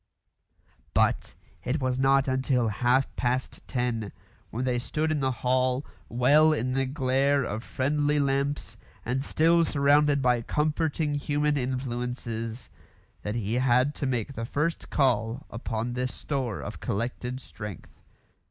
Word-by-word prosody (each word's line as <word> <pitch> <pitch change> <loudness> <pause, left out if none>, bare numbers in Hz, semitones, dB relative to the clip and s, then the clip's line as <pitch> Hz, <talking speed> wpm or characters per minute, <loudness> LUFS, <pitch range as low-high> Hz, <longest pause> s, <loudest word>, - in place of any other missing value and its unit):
But - - +2 0.3
it 130 +5 -1
was 130 -1 -1
not 135 0 +4
until 130 -3 +1
half 125 +5 +1
past 125 +1 -1
ten, 120 -5 -1 0.4
when 125 +3 -3
they 125 -1 +1
stood 155 +5 -1
in 155 - +1
the 135 -1 +1
hall, 130 +1 +1 0.2
well 145 +6 +5
in 130 -3 -1
the 135 0 +1
glare 135 0 +2
of 110 -1 -4
friendly 145 +3 0
lamps 140 +1 -1 0.3
and 130 +3 -1
still 165 +4 +3
surrounded 145 -1 +3
by 125 -2 +2
comforting 150 +3 0
human 145 +1 0
influences, 125 -3 -3 0.5
that 105 +1 -3
he 110 -2 -2
had 130 +3 +3
to 140 - -3
make 125 +1 -1
the 115 - -5
first 150 +7 -2
call 125 -1 +1
upon 115 +1 -3
this 125 0 -2
store 130 -7 -3
of - - -7
collected 125 +4 -3
strength. 105 -5 -9
130 Hz, 135 wpm, -27 LUFS, 120-145 Hz, 0.5 s, well